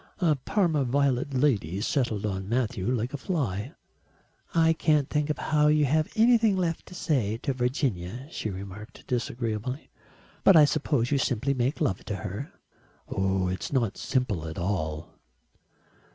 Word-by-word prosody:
A 170 -6 +3
parma 160 +1 +1
violet 135 +1 +1
lady 115 - +1
settled 110 -2 0
on 95 -1 -3
Matthew 115 -5 -1
like 125 +1 -1
a - - -2
fly. 130 - -2 0.8
"I 165 -1 +5
can't 150 -3 +2
think 150 0 -1
how 150 -1 +2
you 150 0 +4
have 155 +3 +1
anything 225 -2 +5
left 170 -3 -2
to 180 - -11
say 120 - 0
to 140 - 0
Virginia," 125 - -2
she 110 - -3
remarked 100 +4 -9
disagreeably. 120 +1 -3 0.5
"But 195 - +7
I 150 - +8
suppose 145 -4 0
you 140 - +3
simply 130 +2 0
make 130 +3 -1
love 130 - 0
to 105 - -3
her." 105 +7 -6 0.6
"It 95 -1 0
is - - -6
not 120 -7 +1
simple 105 -11 -1
at 80 - -7
all." 80 -4 -3
125 Hz, 150 wpm, -27 LUFS, 105-150 Hz, 0.8 s, I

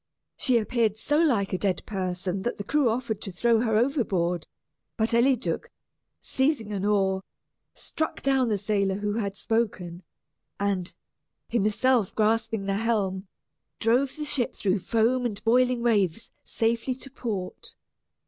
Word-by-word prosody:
She 255 -3 +2
appeared 220 -1 +1
so 295 +7 +1
like 225 -12 +2
a 185 - 0
dead 190 -5 -1
person 185 -1 -3
that 240 - -2
the 205 - -4
crew 275 +3 +2
offered 225 -2 -2
to 195 - -5
throw 230 +5 +2
her 220 -2 +2
overboard, 190 - 0 0.5
but 225 +1 +1
Eliduc, 250 +1 +1 0.5
seizing 265 -6 0
an 195 -1 -2
oar, 195 -2 +2 0.5
struck 315 - -4
down 265 -3 +3
the 210 - +1
sailor 200 -1 0
who 205 +1 -2
had 200 -3 -2
spoken, 200 -7 -2 0.6
and, 195 -3 -1 0.5
himself 230 0 +2
grasping 225 0 +1
the 195 0 0
helm, 200 -4 -1 0.5
drove 250 +4 +2
the 305 -1 -4
ship 260 -5 -1
through 195 0 0
foam 230 +5 +1
and 215 -4 -3
boiling 245 +1 +3
waves 215 -3 +1
safely 230 +3 -1
to 265 +1 -11
port. 205 -8 -5
220 Hz, 140 wpm, -26 LUFS, 195-240 Hz, 0.6 s, down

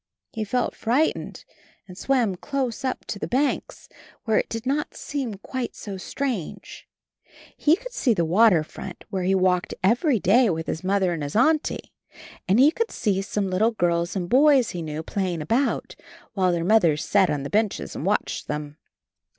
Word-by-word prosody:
He 220 - -2
felt 245 +4 -1
frightened 265 +8 -1 0.4
and 180 - -11
swam 240 -1 +1
close 265 +5 -3
up 260 - -3
to 200 - -5
the - - -3
banks, 275 +3 -1 0.4
where 220 -2 +2
it - - -3
did 225 +1 -5
not 285 +3 -1
seem 265 -7 -4
quite 245 +5 -5
so 200 -2 -7
strange. 230 - -5 0.7
He 305 +2 +4
could - - -10
see 245 - +1
the 170 -3 +1
water 180 -1 +4
front. 175 +3 -9
32 - - -12
CHARLIE - - -34
where 190 -1 -1
he 195 - +3
walked 185 -1 +1
every 240 - +3
day 225 +6 +4
with 160 -2 -2
his 160 - -4
Mother 190 -1 +1
and 165 - -4
his 145 0 -5
Auntie, 310 +7 +1 0.5
and 200 +5 +3
he 285 +4 +7
could 460 +6 -2
see 200 -4 -1
some 200 -1 -2
httle 220 +5 +1
girls 170 +1 0
and 180 -3 -2
boys 270 +1 +4
he 175 - -5
knew 155 0 -5
playing 185 -2 -2
about, 240 - 0 0.4
while 185 -2 +2
their 170 -1 -1
mothers 175 -8 +3
sat 195 -3 +3
on 145 -2 -1
the 140 - -6
benches 215 -1 -1
and - - -5
watched - - -1
them. 150 0 -5
205 Hz, 185 wpm, -24 LUFS, 180-255 Hz, 0.7 s, he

